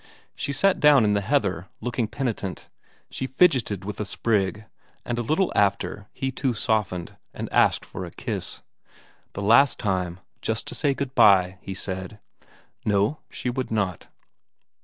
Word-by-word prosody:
She 140 - -3
sat 195 +6 +2
down 145 -6 +6
in 105 - +3
the 100 - +1
heather 100 - 0
looking 120 -2 -1
penitent; 105 -7 -4 0.4
she 130 - -3
fidgeted 130 - +2
with 105 - -5
a - - 0
sprig, 105 0 0 0.4
and 120 0 -2
a - - +1
little 155 - +1
after 100 0 +1
he 135 0 -3
too 130 -2 -1
softened, 105 -6 -1 0.2
and - - -4
asked - - +3
for - - -7
a - - -6
kiss, - - -4 0.7
the 100 - -4
last 115 +6 +5
time, 90 -4 -1 0.2
just 110 0 -1
to - - -4
say 140 -3 +1
good 140 -2 -4
bye, 95 -5 +5
he 95 - -6
said. 95 +3 -5 0.6
No, 105 +8 +1
she 125 - -3
would 130 +1 -3
not. 100 -6 -2
110 Hz, 160 wpm, -25 LUFS, 100-130 Hz, 0.7 s, down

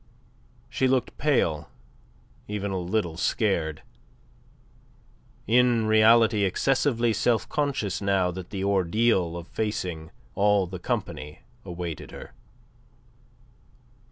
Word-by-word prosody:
She 130 - 0
looked 130 -1 0
pale, 85 - +1 0.8
even 100 -1 -3
a 95 - -2
little 90 -2 -2
scared 85 -6 0 1.6
in 120 0 +3
reality 110 0 +5
excessively 120 +3 +1
self 115 0 +1
conscious 140 - -2
now 95 -2 +1
that 90 0 -8
the 95 -2 -4
ordeal 95 -2 +1
of 85 0 -8
facing 90 -7 -3 0.2
all 100 -1 +3
the 90 0 -7
company 75 -2 -4 0.2
awaited 85 -3 -6
her. - - -11
100 Hz, 100 wpm, -26 LUFS, 90-115 Hz, 1.6 s, reality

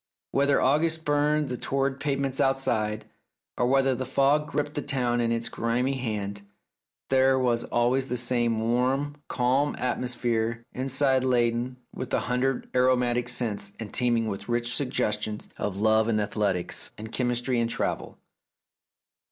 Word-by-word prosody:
Whether 140 0 +3
August 160 +4 +2
burned 150 0 +2
the 125 -1 -3
torrid 135 +1 -1
pavements 140 -2 -1
outside, 110 -5 0 0.5
or 125 - +1
whether 135 0 +3
the 130 +1 -3
fog 140 +3 +2
gripped 145 +1 -2
the 145 - -2
town 125 -4 0
in 115 0 +1
its 115 0 0
grimy 120 +3 0
hand, 105 -6 -3 0.7
there 130 0 +4
was 120 -2 +1
always 125 +3 +1
the 125 - -2
same 120 -2 +1
warm, 130 +5 0
calm 130 +4 +1
atmosphere 120 -2 -1
inside 130 0 +1
laden 120 0 +1 0.2
with 130 - -6
a - - +1
hundred 125 +1 -1
aromatic 125 -1 +2
scents 105 -5 -2
and 110 -3 -7
teeming 120 -2 +2
with 100 +1 -5
rich 120 0 0
suggestions 105 -5 -2
of 95 -2 -3
love 110 +1 +3
and 110 -2 +1
athletics 100 -3 -1
and 110 +1 -8
chemistry 125 0 0
and 115 0 +1
travel. - - -3
125 Hz, 145 wpm, -27 LUFS, 115-135 Hz, 0.7 s, there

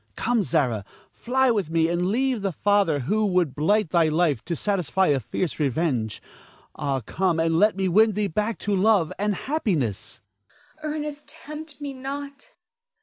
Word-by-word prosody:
Come, 240 -1 +1
Zara, 135 - 0 0.3
fly 260 +1 +1
with 200 -8 -1
me, 165 0 +2
and 175 +1 0
leave 250 +2 0
the 195 -1 -1
father 195 -5 +2
who 210 - 0
would 180 -8 +1
blight 200 +4 +1
thy 170 -3 +4
life 155 -6 +1
to 170 - -2
satisfy 190 -1 0
a 140 -2 +3
fierce 160 - -3
revenge. 135 -6 -1 0.5
Ah, 140 -3 -2
come 175 - 0
and 165 0 +2
let 210 +1 +4
me 190 -1 0
win 215 +4 +4
thee 210 +1 0
back 210 +4 -1
to 205 -1 +1
love 195 -4 +3
and 205 0 0
happiness. 180 - -2 0.6
Zara. 305 0 -3
Ernest, 295 -1 -5
tempt 305 0 -8
me 285 -2 -5
not. 280 - -7
190 Hz, 165 wpm, -24 LUFS, 160-230 Hz, 0.6 s, thy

